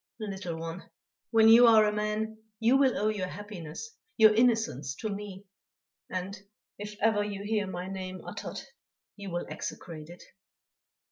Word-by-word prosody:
"Little 190 -5 -4
one, 165 +2 -7 0.4
when 225 -1 +5
you 235 +2 +9
are 220 -2 +7
a 210 - +2
man, 215 +1 -2 0.2
you 235 +3 +4
will 270 -2 +4
owe 210 +1 +1
your 200 -4 -2
happiness, 205 - -8 0.2
your 220 -2 +7
innocence 220 - +1
to 220 - -4
me; 200 -1 -7 0.6
and, 185 +2 -4 0.4
if 210 0 -6
ever 215 -2 +3
you 200 -1 -5
hear 210 -1 0
my 180 0 -5
name 185 -1 -6
uttered, - - -6 0.6
you 200 -2 -7
will 175 0 -3
execrate 160 -3 -7
it." 175 - -12
205 Hz, 150 wpm, -29 LUFS, 185-220 Hz, 0.6 s, you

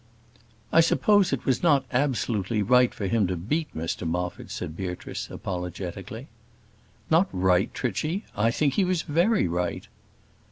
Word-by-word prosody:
"I 165 - +7
suppose 200 +3 +3
it 135 - -2
was 130 -2 +1
not 145 -6 +3
absolutely 115 -6 0
right 125 +3 +4
for 100 - -5
him 105 0 +2
to 90 - -2
beat 150 - -1
Mr 80 +1 -3
Moffat," 90 +1 -3
said 80 - -5
Beatrice, 90 -1 -5
apologetically. 90 -1 -6 0.9
"Not 170 +5 +4
right, 90 +1 +2
Trichy? 155 - -2
I 105 +3 +2
think 140 +3 +1
he 195 - +2
was 180 -2 0
very 170 - +2
right." 85 +1 -2
115 Hz, 145 wpm, -26 LUFS, -, 0.9 s, I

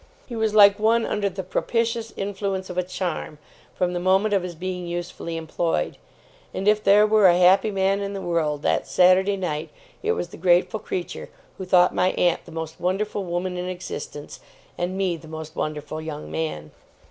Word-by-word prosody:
He 240 - -7
was 220 -1 0
like 200 -1 +7
one 225 +2 +3
under 205 -1 -1
the 190 0 -6
propitious 230 +4 -1
influence 195 -1 -3
of 180 - -8
a - - +3
charm, 180 -4 -4 0.4
from 180 -1 0
the 175 - -1
moment 190 +4 +2
of 195 - +3
his 175 -1 -6
being 180 +1 -4
usefully 170 -1 -5
employed; 165 - -2 0.6
and 195 - -2
if 210 0 +4
there 205 +2 +6
were 215 -2 +5
a 175 -1 +5
happy 185 +4 +5
man 195 0 +1
in 200 0 -3
the 195 - -4
world, 155 -4 -1
that - - +1
Saturday 190 +2 +4
night, 155 -5 -3 0.3
it 435 +1 +1
was 175 - -3
the - - -11
grateful 180 +4 +2
creature 180 -3 -5 0.3
who 190 - -4
thought 180 -1 +4
my 185 +1 +2
aunt 175 -2 +1
the 170 - -12
most 160 0 -6
wonderful 200 +3 -1
woman 180 +1 -3
in 180 0 -3
existence, 160 -5 -7 0.4
and 180 +2 -3
me 185 -3 0
the 160 - -14
most 160 0 -8
wonderful 155 +1 -4
young 150 - -7
man. 75 -1 -4
180 Hz, 190 wpm, -24 LUFS, 170-200 Hz, 0.6 s, like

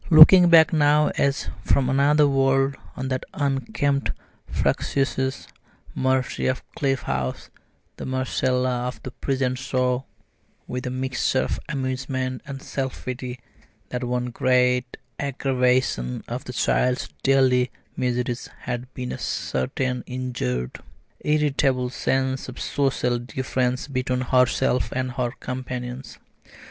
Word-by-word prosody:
Looking 175 +2 +10
back 165 -1 +7
now 150 -1 +4
as 140 0 0
from 130 +6 +2
another 145 +3 +4
world 135 0 +2 0.2
on 130 +1 -3
that 130 -1 -1
unkempt 140 0 0 0.4
fractious 135 -1 0 0.5
Marcie 130 0 0
of 130 0 -1
Cliff 135 -3 0
House, 65 -1 -3 0.5
the - - -6
Marcella 130 -1 0
of 125 - -5
the 130 - -6
present 130 -1 -1
saw 130 -1 0 0.6
with 125 0 -4
a - - -1
mixture 130 0 0
of - - -2
amusement 130 -2 -2
and 135 -1 -7
self 135 -2 -4
pity 125 0 -5 0.5
that 125 0 -3
one 125 0 -1
great 125 0 +2 0.2
aggravation 125 - 0
of - - -5
that - - -7
child's 125 0 +1
daily 130 -2 +4 0.3
miseries 125 -1 -1
had 125 0 -4
been 125 -1 -4
a - - -5
certain 125 - -2
injured, 120 - -3 0.4
irritable 140 -4 +1
sense 130 0 -1
of 125 - -9
social 125 -3 0
difference 130 +1 -2
between 130 -2 -1
herself 125 0 +2
and 130 0 -1
her 125 0 -1
companions. 125 0 -5
130 Hz, 120 wpm, -24 LUFS, 125-135 Hz, 0.6 s, Looking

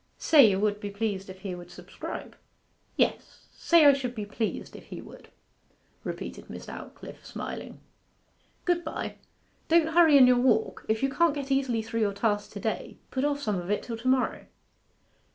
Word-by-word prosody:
'Say 285 -8 +6
you 190 -1 0
would 210 0 +1
be 205 - -5
pleased 200 -2 -3
if 190 0 -10
he 195 -3 -4
would 175 0 -9
subscribe?' - - -8 0.6
'Yes - - -1
say 335 -3 +4
I 285 - +9
should 255 -3 -3
be 210 -2 -4
pleased 215 +1 -4
if - - -11
he - - -8
would,' - - -13 0.7
repeated - - -6
Miss - - -8
Aldclyffe, - - -10
smiling. - - -7 0.9
'Good 350 -1 +1
bye. 315 - -5 0.5
Don't 330 -1 +4
hurry 325 -4 +7
in 260 - +9
your 250 -1 +5
walk. 245 -3 +1
If 220 +3 +1
you 270 - +3
can't 335 +1 +2
get 280 -1 -4
easily 260 -5 +1
through 225 +1 -3
your 205 -2 +1
task 205 0 0
to - - -6
day - - -3
put 260 - -1
off 290 0 0
some 210 -3 0
of 175 +1 -7
it 205 - 0
till 230 -2 -5
to 235 +3 -6
morrow. 260 -1 +1
240 Hz, 185 wpm, -28 LUFS, 205-280 Hz, 0.9 s, I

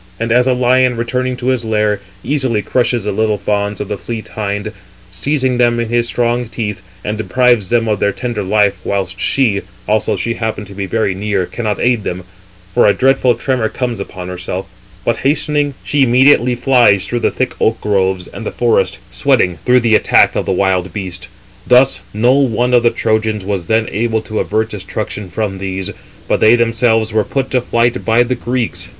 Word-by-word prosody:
And 115 0 -2
as 125 +2 +4
a 130 - +3
lion, 125 0 +2
returning 125 +2 -2
to 125 0 -2
his 130 -2 0
lair, 105 -2 0 0.2
easily 130 -6 0
crushes 120 -2 0
the 105 - -2
little 110 +1 0
fawns 100 0 -2
of 105 - -4
the 105 -1 -4
fleet 110 +5 -6
hind, 105 0 -3 0.4
seizing 130 +5 -1
them 120 -1 +3
in 115 -1 -2
his 120 0 +1
strong 120 0 0
teeth, 105 -4 -4 0.2
and 105 +1 -3
deprives 120 -3 +2
them 115 -1 +1
of 105 -2 0
their 100 - +2
tender 120 0 -4
life, 100 0 +1
whilst 95 -1 -3
she, 115 -8 +1 0.3
although 110 0 +1
she 115 - -2
happen 110 -3 -4
[to 100 - -12
be] 100 0 -4
very 105 0 0
near, 100 -1 -1
cannot 110 +1 -3
aid 120 -3 +1
them; 90 +1 -4 0.5
for - - +4
a 100 - +4
dreadful 130 -2 +3
tremor 120 -1 -1
comes 120 -4 -3
upon 95 -2 -7
herself; 90 +1 -5 0.4
but 115 - +1
hastening, 145 0 0
she 145 -1 0
immediately 125 0 +4
flies 120 -6 +3
through 120 - -2
the - - +1
thick 130 -1 -2
oak 115 - +2
groves 95 -3 0
and - - -9
the - - -3
forest, 100 -5 +1
sweating, 115 - +1
through 125 0 +4
the 115 -1 +2
attack - - +4
of - - -2
the - - +1
wild 95 -1 0
beast. 90 -2 -6 0.4
Thus 125 +2 +4
no 120 +5 +3
one 125 -3 +1
of 120 - +5
the 120 - +4
Trojans 110 -3 -1
was 95 -4 -3
then 110 +1 +1
able 110 0 -1
to 110 - -4
avert 110 +1 -1
destruction 105 0 -5
from 95 +1 -3
these, 95 0 -4 0.4
but - - +1
they 110 +2 +6
themselves 115 -2 +1
were 110 -1 +2
put 135 +3 -3
to 125 - +2
flight 120 0 0
by 115 +2 +3
the 125 +1 -1
Greeks. 120 -1 -3
110 Hz, 195 wpm, -15 LUFS, 100-125 Hz, 0.5 s, they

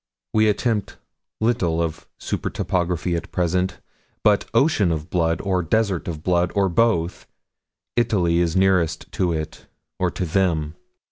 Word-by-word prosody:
We 110 0 +4
attempt 105 0 -1 0.4
little 110 -8 +1
of 80 -2 -3
super - - -3
topography, 90 -1 -1
at 85 - -5
present, 90 +1 0 0.4
but 105 -1 +3
Ocean 115 - +3
of 80 -1 -4
Blood, 85 -2 +1
or 95 -2 0
Desert 95 +1 0
of 80 -3 -5
Blood 90 -1 +2
or 100 -1 +3
both 90 -3 +1 0.7
Italy 95 -8 +2
is 85 -2 +1
nearest 90 -4 +2
to 90 -3 0
it 80 -1 -5 0.3
or - - +2
to 90 - -3
them. 80 -4 0
90 Hz, 140 wpm, -22 LUFS, 85-100 Hz, 0.7 s, We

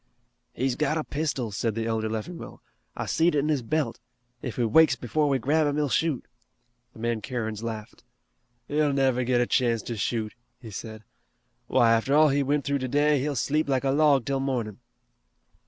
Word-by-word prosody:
"He's 130 0 0
got 155 +2 0
a 155 - -1
pistol," 140 -7 -2
said 110 +2 -2
the 115 0 -2
elder 110 -1 -1
Leffingwell, 110 +11 -6 0.3
"I - - -2
seed 165 0 +2
it - - +2
in 145 +2 +1
his 145 -4 +1
belt. 150 +6 -1 0.4
If 125 - -5
he 120 - 0
wakes 135 +5 +5
before 145 +5 0
we 135 - +2
grab 150 +4 +2
him 145 - 0
he'll 150 -1 0
shoot." 155 -2 0 0.7
The - - -16
man 115 0 -2
Kerins 110 -4 -4
laughed. 115 0 -6 0.6
"He'll 150 -1 +1
never 130 -2 +2
get 120 0 +2
a - - +3
chance 120 -3 +1
to 120 - -4
shoot," 110 0 -2 0.3
he 115 -3 -10
said. 110 +1 -8 0.6
"Why, 120 -3 +4
after 115 +5 +2
all 155 0 +6
he 140 +1 +2
went 145 +1 0
through 140 0 0
today, 145 +3 +2
he'll 145 +2 -2
sleep 145 +6 0
like 130 -1 +1
a 135 - +2
log 145 -3 +3
till 135 -1 -1
mornin'." 125 -6 -2
130 Hz, 190 wpm, -26 LUFS, 115-145 Hz, 0.7 s, all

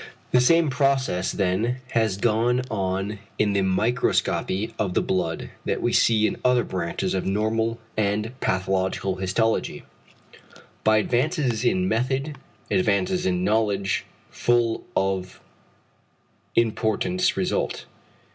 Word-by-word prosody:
The 125 - +5
same 160 +3 +4
process, 135 -8 +1
then, 105 +6 0
has 110 -4 +1
gone 120 +4 +2
on 95 0 -2 0.2
in 105 -1 +2
the 100 - +2
microscopy 110 +1 0
of 95 -4 -1
the - - +3
blood 85 -3 -2
that - - -1
we - - 0
see 110 -2 +4
in - - -1
other 125 -1 +3
branches 90 +1 -2
of 95 - -1
normal 110 +3 0 0.2
and 105 +1 0
pathological 95 0 -1
histology: 95 +5 0 1.0
by 110 0 +4
advances 125 - 0
in 95 -6 +2
method, 130 +7 -1 0.4
advances 180 - +1
in 180 -1 0
knowledge 105 - +1 0.3
full 120 -2 +1
of 95 -1 -1 1.2
importance 110 -5 +1
result. - - -1
110 Hz, 115 wpm, -24 LUFS, 95-120 Hz, 1.2 s, The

